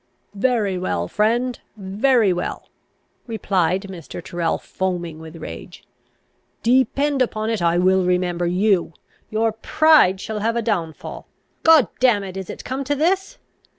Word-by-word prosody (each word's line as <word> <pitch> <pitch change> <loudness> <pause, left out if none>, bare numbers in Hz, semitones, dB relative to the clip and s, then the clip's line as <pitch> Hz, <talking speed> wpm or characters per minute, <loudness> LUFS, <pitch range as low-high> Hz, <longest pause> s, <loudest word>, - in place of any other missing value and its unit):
"Very 205 -4 0
well, 85 - -2
friend; 235 - 0 0.2
very 210 +2 +2
well!" 175 0 -5 0.6
replied 190 -5 0
Mr. 185 -5 -8
Tyrrel, 170 -1 -2
foaming 175 -4 -4
with 160 0 -11
rage. 165 +2 -9 0.8
"Depend 265 +3 +2
upon 220 -2 0
it, 220 -5 -1
I 170 0 +2
will 185 +1 +3
remember 180 -1 0
you! 185 -1 +1 0.4
Your 220 +1 +1
pride 220 -3 +4
shall 215 +2 -4
have 225 +2 0
a 235 - -1
downfal! 175 -8 -3 0.3
God 320 - +6
damn 240 -6 +3
it! 190 -1 -7
is 190 -2 -6
it - - -8
come 265 +2 -3
to 290 - 0
this? 380 - 0
200 Hz, 140 wpm, -21 LUFS, 180-240 Hz, 0.8 s, God